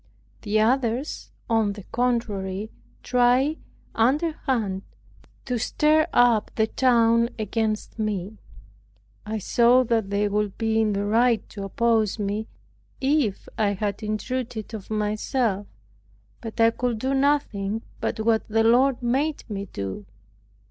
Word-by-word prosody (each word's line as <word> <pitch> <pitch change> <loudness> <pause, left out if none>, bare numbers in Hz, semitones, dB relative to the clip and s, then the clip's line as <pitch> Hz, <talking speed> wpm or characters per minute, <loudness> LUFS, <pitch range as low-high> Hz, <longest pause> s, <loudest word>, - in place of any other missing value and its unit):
The 215 +1 0
others, 245 +4 0 0.2
on 225 -3 +1
the 205 -1 -10
contrary, 215 -5 -1 0.3
tried 250 +5 +2 0.3
underhand 250 - 0 0.6
to 250 -2 -1
stir 305 +6 +2
up 240 -3 +4
the 220 - +3
town 235 -1 +3
against 220 0 -2
me. 210 -1 -3 0.9
I 220 +1 -2
saw 240 +5 +4
that 225 -4 0
they 200 +1 +1
would 205 -1 -1
be 225 -1 +1
in 215 -1 +1
the 200 +1 -1
right 230 +1 +2
to 200 -2 -6
oppose 220 0 +1
me, 210 +1 -2 0.5
if 270 -7 0
I 205 -2 +2
had 200 +1 -3
intruded 220 +1 -4
of 215 -3 -7
myself; 215 0 -1 0.7
but 225 0 -8
I 225 0 +6
could 240 -1 -2
do 260 +5 -1
nothing 230 -7 0 0.2
but 220 - -2
what 220 0 +1
the 225 +1 +2
Lord 245 +3 +3
made 280 +6 0
me 200 -3 -5
do. 100 - -6
225 Hz, 130 wpm, -24 LUFS, 210-245 Hz, 0.9 s, I